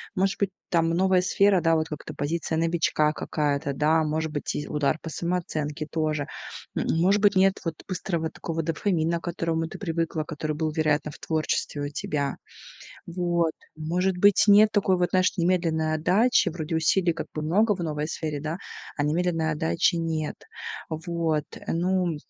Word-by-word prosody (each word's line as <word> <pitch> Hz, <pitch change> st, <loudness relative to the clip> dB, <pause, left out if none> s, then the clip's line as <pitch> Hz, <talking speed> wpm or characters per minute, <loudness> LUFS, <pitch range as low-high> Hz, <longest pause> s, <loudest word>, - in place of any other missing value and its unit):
Может 190 Hz, 0 st, +1 dB
быть, 200 Hz, -2 st, +1 dB, 0.2 s
там 165 Hz, -2 st, +2 dB
новая 185 Hz, +1 st, +3 dB
сфера, 195 Hz, 0 st, +3 dB
да, 165 Hz, -1 st, +3 dB
вот 160 Hz, 0 st, 0 dB
как-то 150 Hz, -, -7 dB
позиция 160 Hz, +2 st, -2 dB
новичка 165 Hz, -2 st, +2 dB
какая-то, 145 Hz, -3 st, -1 dB
да, 155 Hz, +3 st, +3 dB
может 155 Hz, +1 st, -1 dB
быть, 145 Hz, -, -3 dB
и 150 Hz, -, -3 dB
удар 150 Hz, +1 st, 0 dB
по 160 Hz, -, -6 dB
самооценке 155 Hz, -3 st, -3 dB
тоже. 155 Hz, -2 st, -1 dB, 0.5 s
М -, -, 0 dB, 0.2 s
может 195 Hz, +4 st, +3 dB
быть, 205 Hz, -1 st, +4 dB
нет 195 Hz, +1 st, +4 dB
вот 165 Hz, -1 st, -2 dB
быстрого 170 Hz, -4 st, -2 dB
такого 165 Hz, 0 st, -4 dB
дофамина, 165 Hz, 0 st, 0 dB
к -, -, -24 dB
которому 165 Hz, -1 st, -1 dB
ты -, -, -9 dB
привыкла, 165 Hz, -3 st, -1 dB
который 155 Hz, -1 st, -4 dB
был, 155 Hz, 0 st, -1 dB
вероятно, 155 Hz, -1 st, +1 dB
в -, -, -12 dB
творчестве 155 Hz, -2 st, -1 dB
у 145 Hz, -, -2 dB
тебя. 145 Hz, -1 st, -2 dB, 0.7 s
Вот. 170 Hz, -2 st, 0 dB, 0.2 s
Может 180 Hz, +4 st, 0 dB
быть, 205 Hz, +1 st, +5 dB
нет 210 Hz, +1 st, +7 dB
такой 195 Hz, -3 st, +3 dB
вот, 175 Hz, 0 st, +1 dB
знаешь, 185 Hz, +2 st, +2 dB
немедленной 165 Hz, -3 st, +1 dB
отдачи. 195 Hz, +7 st, +3 dB
Вроде 160 Hz, -1 st, -3 dB
усилий 170 Hz, +2 st, +3 dB
как -, -, -5 dB
бы 155 Hz, -, -3 dB
много 205 Hz, +7 st, +3 dB
в 180 Hz, -, -8 dB
новой 150 Hz, -1 st, -2 dB
сфере, 155 Hz, -3 st, -3 dB
да, 155 Hz, +3 st, -3 dB, 0.4 s
а 145 Hz, -, 0 dB
немедленной 165 Hz, +1 st, +1 dB
отдачи 150 Hz, -, +1 dB
нет. 160 Hz, -2 st, -2 dB, 0.5 s
Вот. 160 Hz, -2 st, -1 dB, 0.2 s
Ну, 175 Hz, -1 st, 0 dB
165 Hz, 165 wpm, -26 LUFS, 155-180 Hz, 0.7 s, нет